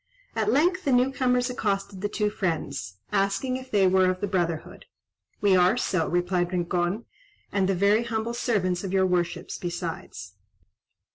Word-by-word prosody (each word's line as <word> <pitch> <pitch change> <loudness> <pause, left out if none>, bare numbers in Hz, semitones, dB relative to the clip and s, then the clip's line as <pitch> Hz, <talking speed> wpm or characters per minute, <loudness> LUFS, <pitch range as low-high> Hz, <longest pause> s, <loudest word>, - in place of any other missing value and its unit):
At 215 -1 +1
length 355 +8 +2
the 280 - +1
new 250 +1 +4
comers 250 -2 +1
accosted 195 -4 -2
the 205 - -1
two 210 0 0
friends, 160 - -3 0.2
asking 200 +7 0
if 260 0 -10
they 200 -4 +3
were 185 0 +4
of 185 0 -1
the 205 - -1
brotherhood. 175 -5 -2 0.6
"We 200 -2 +4
are 185 +5 +4
so," 185 -9 0
replied 175 0 0
Rincon, 175 +4 -1 0.5
"and 195 -1 +1
the 195 - +2
very 205 +5 +3
humble 230 0 -2
servants 205 -7 0
of 190 - -4
your 190 -1 +4
worships 180 -2 -1
besides." 170 - -5
195 Hz, 160 wpm, -26 LUFS, 180-230 Hz, 0.6 s, new